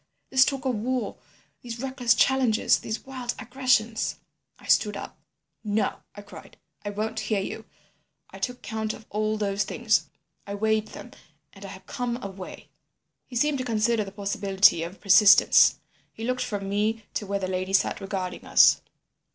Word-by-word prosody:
—this 260 0 +6
talk 270 -2 -3
of 260 - +1
war, 245 +3 -2 0.5
these 235 -1 -7
reckless 260 -2 +1
challenges, 260 -5 +3
these 220 - -5
wild 255 -2 -5
aggressions—' 245 -3 0 0.4
"I - - -17
stood 210 -2 +2
up. - - -8 0.5
"'No,' 210 0 -1 0.2
I 205 - -10
cried. 205 - -13 0.3
'I 205 - -3
won't 220 +2 -3
hear 215 -3 -1
you. 195 - -5 0.7
I - - -11
took 250 0 -4
count 220 -1 -3
of 215 - -12
all 215 +1 -1
those 200 -1 0
things, 220 +2 0 0.4
I 200 - -4
weighed 220 +1 +1
them—and - - -14
I - - -7
have - - -11
come 245 -2 -3
away.' 195 -1 -9 0.6
"He 250 - -11
seemed 285 +3 +1
to - - -2
consider 230 -1 +1
the 195 - -9
possibility 195 -3 +2
of 170 +4 -6
persistence. 200 +1 +6 0.3
He 225 - -9
looked 255 +2 -1
from 200 -3 -4
me 210 +2 -1
to 205 - -3
where 200 0 -1
the 190 -1 -3
lady 185 +1 -3
sat 195 - +1
regarding 190 -2 -4
us. - - +5
215 Hz, 165 wpm, -26 LUFS, 200-245 Hz, 0.7 s, this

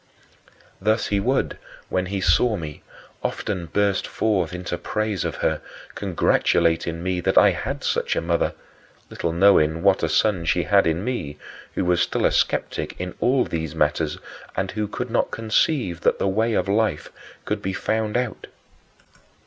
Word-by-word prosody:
" - - -29
Thus 110 +1 +2
he 100 - +1
would, 130 +6 0 0.3
when 90 0 0
he 95 0 -3
saw 90 +6 +3
me, 75 -4 -7 0.4
often 90 -5 -3
burst 100 +3 +1
forth 95 -7 0
into 90 -1 -4
praise 110 -4 -2
of - - -3
her, - - +1 0.3
congratulating 85 0 +1
me 95 -1 -1
that 90 - 0
I - - +7
had - - -4
such - - 0
a - - 0
mother 85 0 0 0.6
little 85 - -2
knowing 85 -3 +4
what 100 -1 +4
a 80 - 0
son 95 +1 +2
she 85 +2 +2
had 100 0 +4
in 80 +3 0
me, 90 - -3 0.4
who 95 - 0
was 90 -1 +2
still - - 0
a - - +4
skeptic - - -1
in 90 0 -4
all 130 +1 +3
these 80 -2 -4
matters 75 -2 +1 0.4
and - - -1
who 105 0 -2
could 125 +3 -5
not 120 - +1
conceive 110 - 0
that - - +2
the - - 0
way 110 +4 +1
of 90 - +1
life 105 -6 0 0.3
could 105 -1 -2
be 95 -1 -2
found 110 +2 -1
out. 125 -4 -3
95 Hz, 170 wpm, -23 LUFS, 85-110 Hz, 0.6 s, I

